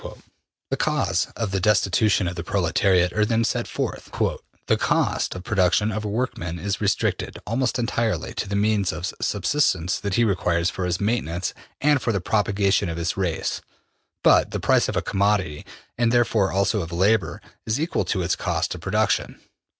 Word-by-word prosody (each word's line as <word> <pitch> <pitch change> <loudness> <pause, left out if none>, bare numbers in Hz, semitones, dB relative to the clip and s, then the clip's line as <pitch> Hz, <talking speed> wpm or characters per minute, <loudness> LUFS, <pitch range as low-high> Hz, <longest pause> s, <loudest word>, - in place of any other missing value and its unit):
'' - - -55
The - - 0
cause - - 0
of 110 -4 -2
the 100 - 0
destitution 100 0 +2
of 85 - -3
the 85 - -4
proletariat 90 0 +2
are 105 - +2
then 115 +1 +1
set 115 - -1
forth. - - -4
``The - - -2
cost - - 0
of 90 - -7
production 100 +2 +2
of 110 +1 -3
a - - -3
workman 100 -7 -3
is 100 +3 -3
restricted, 100 -2 -1
almost 125 +3 0
entirely, 115 -2 -1
to 100 - -4
the 100 - -2
means 100 -2 +1
of 85 +3 -4
subsistence 95 - +1
that 100 -2 -2
he 120 - +3
requires 90 -4 +1
for 95 - -3
his 90 +1 -1
maintenance 100 -5 -1 0.3
and 145 -1 +3
for 115 - 0
the 100 - 0
propagation 100 -1 +1
of 85 - -4
his 85 +1 -1
race. 90 -5 -2 0.6
But - - +5
the - - -3
price - - +2
of - - -3
a - - 0
commodity, 95 -6 0 0.3
and 120 -1 +3
therefore 115 -5 +2
also 100 +2 +1
of 85 0 -6
labor, 95 -1 +1 0.3
is 110 +5 0
equal 160 +3 -1
to 95 -4 -1
its 85 - +1
cost - - -1
of - - -9
production. - - 0
100 Hz, 180 wpm, -23 LUFS, 90-110 Hz, 0.6 s, But